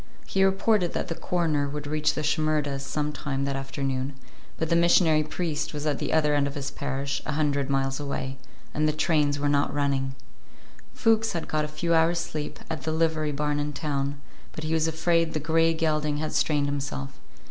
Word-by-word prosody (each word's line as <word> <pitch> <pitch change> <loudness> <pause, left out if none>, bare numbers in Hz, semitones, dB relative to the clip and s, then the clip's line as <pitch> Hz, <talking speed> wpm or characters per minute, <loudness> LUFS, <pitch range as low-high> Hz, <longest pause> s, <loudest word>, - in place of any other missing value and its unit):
He 195 - +2
reported 195 -1 +2
that - - -2
the - - 0
coroner 160 -5 0
would 145 0 -5
reach 150 +1 +1
the 155 - -2
Shimerdas' 150 -2 +1
sometime 145 -1 -2
that 140 0 -1
afternoon, 135 0 -3 0.4
but 160 - -1
the - - +5
missionary 170 -2 +5
priest 155 -1 -3
was 150 0 -4
at 150 -2 0
the - - -2
other 150 -2 +3
end 145 -1 +2
of 140 - -6
his 140 -1 -3
parish, 140 -1 -3
a 150 - -3
hundred 145 -2 +1
miles 135 0 0
away, 135 -2 -4 0.3
and 155 +1 +2
the 155 - +2
trains 150 -2 +2
were 145 0 0
not 145 0 +2
running. 140 -2 0 0.8
Fuchs 225 -1 +3
had 170 - -3
got 155 0 0
a - - -4
few 170 +3 -1
hours' 165 +1 +4
sleep 165 -3 -4
at 160 -3 -4
the 155 - -2
livery 160 -1 +1
barn 145 0 -1
in 145 0 -2
town, 140 -2 -2 0.3
but 155 - -6
he 155 +1 -1
was 160 0 +2
afraid 165 +1 +1
the 155 - 0
gray 165 +2 +3
gelding 155 -2 0
had 155 +1 -3
strained 150 -2 +2
himself. 140 -1 -4
150 Hz, 195 wpm, -26 LUFS, 140-160 Hz, 0.8 s, the